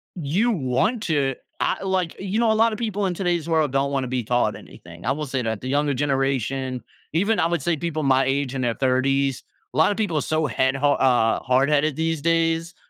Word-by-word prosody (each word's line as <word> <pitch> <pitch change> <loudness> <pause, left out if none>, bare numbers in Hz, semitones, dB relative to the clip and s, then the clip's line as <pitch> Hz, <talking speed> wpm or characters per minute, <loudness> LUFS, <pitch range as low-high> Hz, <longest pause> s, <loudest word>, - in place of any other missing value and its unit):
you 180 +9 0
want 200 - 0
to, 140 -7 +1 0.3
ah - - 0
like, 185 -3 -1
you 195 +2 -3
know, 230 -1 +3
a - - +3
lotta 225 0 +3
people 205 -3 -2
in 180 - -2
today's 175 -3 -1
world 155 -4 +2
don't 140 +1 0
wanna 135 -2 -1
be 125 -1 -2
taught 120 +2 +1
anything, 85 0 -13
I 125 - 0
will 150 +2 -2
say 135 -2 -2
that. 110 -3 -3
The 130 - -6
younger 145 0 +1
generation, 135 -2 -1 0.3
even 200 +5 +1
I 165 - +3
would 170 -4 -2
say 170 0 +1
people 155 0 -3
my 135 -1 +3
age 135 0 -1
in 135 - -3
their 120 -2 0
30s, 135 0 +1 0.3
a - - -6
lotta 160 +6 +4
people 200 -8 -1
are - - +1
so 155 0 0
head 130 +1 +1
ha 145 +1 +2
uh, 125 -4 +2
hardheaded 140 +3 +2
these 160 -2 -1
days. 165 +1 +1
145 Hz, 215 wpm, -23 LUFS, 130-170 Hz, 0.3 s, lotta